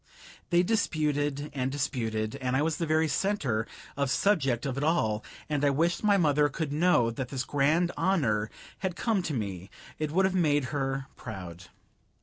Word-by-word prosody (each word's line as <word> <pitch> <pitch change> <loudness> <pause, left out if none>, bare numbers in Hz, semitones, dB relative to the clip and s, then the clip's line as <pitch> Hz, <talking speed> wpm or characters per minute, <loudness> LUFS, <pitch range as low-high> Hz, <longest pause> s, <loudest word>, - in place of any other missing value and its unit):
They 175 +1 +4
disputed 150 -7 0
and 130 -1 -1
disputed, 115 -5 -2
and 130 -1 -1
I 145 - +2
was 160 0 0
the 165 - -2
very 155 +1 +3
center 140 - 0 0.3
of 140 -1 0
subject 135 - +2
of 135 -2 -2
it 140 - -2
all, 110 -10 +1 0.2
and 150 -2 -1
I 145 - +5
wished 165 +8 +1
my 205 -1 +4
mother 150 -4 +3
could 145 0 -3
know 150 -7 +3
that 125 +1 -5
this 130 -2 -2
grand 155 +6 +2
honor 125 - +1 0.3
had 190 -3 -2
come 215 -1 +1
to 155 -5 -3
me; 100 -4 -4 0.3
it 155 -1 -1
would 190 +5 +3
have 190 - +1
made 150 -6 +2
her 135 -1 -1
proud. 90 -6 -8
145 Hz, 175 wpm, -28 LUFS, 125-165 Hz, 0.3 s, I